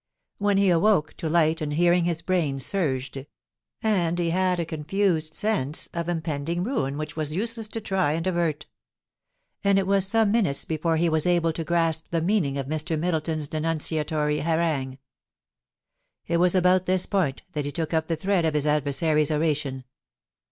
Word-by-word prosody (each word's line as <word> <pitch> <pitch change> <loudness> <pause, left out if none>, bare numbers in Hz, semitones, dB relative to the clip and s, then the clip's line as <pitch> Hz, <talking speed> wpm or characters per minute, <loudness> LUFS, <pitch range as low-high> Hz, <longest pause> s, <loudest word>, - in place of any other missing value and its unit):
When 205 -1 +2
he 195 -2 +4
awoke 170 -3 +2
to 160 - -3
light 160 -1 +2
and 150 -1 -2
hearing 175 +2 +3
his 165 -2 -2
brain 165 -7 0
surged, 135 -4 -2 0.6
and 175 -6 +1
he 170 -1 0
had 185 0 +1
a 170 - -1
confused 160 0 -1
sense 185 -10 0
of 170 0 -3
impending 165 0 -2
ruin 185 - -2
which 155 0 -4
it - - -17
was 155 -1 -2
useless 225 +2 -2
to 225 - -5
try 190 -7 0
and 165 +2 -2
avert; 170 -5 -1 1.0
and 200 -1 +3
it 195 - +2
was 195 0 +3
some 225 0 +2
minutes 195 -11 +1
before 160 +1 0
he 170 +2 +2
was 160 0 +1
able 170 -2 +2
to 165 - -4
grasp 165 -1 0
the 170 - 0
meaning 165 -6 0
of 135 - -3
Mr. 155 +3 -1
Middleton's 160 -2 -1
denun 160 +2 -1
ciatory 150 -1 -1
harangue. 155 -5 -1 1.3
It 170 - 0
was 180 +1 +3
about 185 0 +3
this 185 0 +1
point 170 -9 -1
that 150 -4 -3
he 145 - -3
took 160 +3 -3
up 160 0 +1
the 165 - 0
thread 185 +2 0
of 160 -2 0
his 150 -1 0
adversary's 150 +1 +1
oration. 150 -4 -1
165 Hz, 180 wpm, -25 LUFS, 150-180 Hz, 1.3 s, he